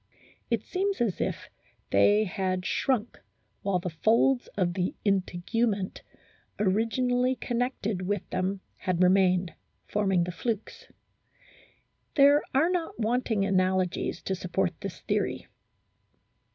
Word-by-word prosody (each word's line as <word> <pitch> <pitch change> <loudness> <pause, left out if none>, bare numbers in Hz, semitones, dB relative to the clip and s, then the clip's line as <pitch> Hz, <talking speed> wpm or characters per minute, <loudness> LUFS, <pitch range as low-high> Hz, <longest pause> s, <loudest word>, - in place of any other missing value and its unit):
It - - 0
seems 390 +1 -1
as 225 -6 0
if - - -3 0.4
they 210 +1 +5
had 185 -2 -2
shrunk 245 -4 0 0.4
while 195 -2 +1
the 180 0 -4
folds 230 +9 +2
of 175 -3 +1
the 180 0 -1
integument 200 +2 0 0.6
originally 245 +5 +1
connected 240 -6 -2
with 205 -1 -2
them 185 +1 -1 0.2
had 185 -1 0
remained, 185 -1 +3 0.3
forming 195 -4 +1
the 180 - -3
flukes. 220 +3 -4 1.3
There 285 +1 +6
are 310 +7 +3
not 340 -8 -2
wanting 225 -2 +1
analogies 185 -1 0
to 190 - -1
support 180 0 -1
this 195 -3 -6
theory. - - -1
200 Hz, 110 wpm, -28 LUFS, 185-240 Hz, 1.3 s, There